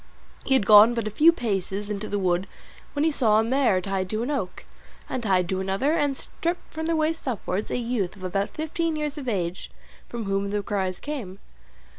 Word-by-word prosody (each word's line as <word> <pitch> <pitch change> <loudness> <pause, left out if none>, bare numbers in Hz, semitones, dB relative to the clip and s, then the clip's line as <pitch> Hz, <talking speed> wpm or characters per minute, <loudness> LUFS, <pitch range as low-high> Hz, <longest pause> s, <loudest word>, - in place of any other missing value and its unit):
He 270 - +3
had 215 - +3
gone 215 +3 +8
but 230 -2 -1
a 215 - -3
few 310 +10 +6
paces 205 - -3
into 210 +1 -3
the 205 - -1
wood, 185 0 +1 0.5
when 290 - 0
he 320 - +3
saw 220 -7 +3
a - - +3
mare 240 -5 +2
tied 190 -1 -2
to 215 +3 -1
an 265 - -2
oak, 195 -11 -3 0.4
and 255 - -3
tied 185 -5 +2
to 190 - 0
another, 195 +9 0
and 290 -4 +1
stripped 345 +2 -4
from 320 0 -3
the 330 - +1
waist 315 -1 -1
upwards, 210 -4 -2
a - - -1
youth 230 -6 -2
of 190 - -13
about 195 +2 -1
fifteen 320 +1 -2
years 300 -1 -3
of 265 - -7
age, 180 -4 -2 0.4
from 235 -1 -4
whom 195 0 -1
the 205 0 -1
cries 190 -3 -2
came. 245 -11 -5
215 Hz, 210 wpm, -25 LUFS, 195-285 Hz, 0.5 s, gone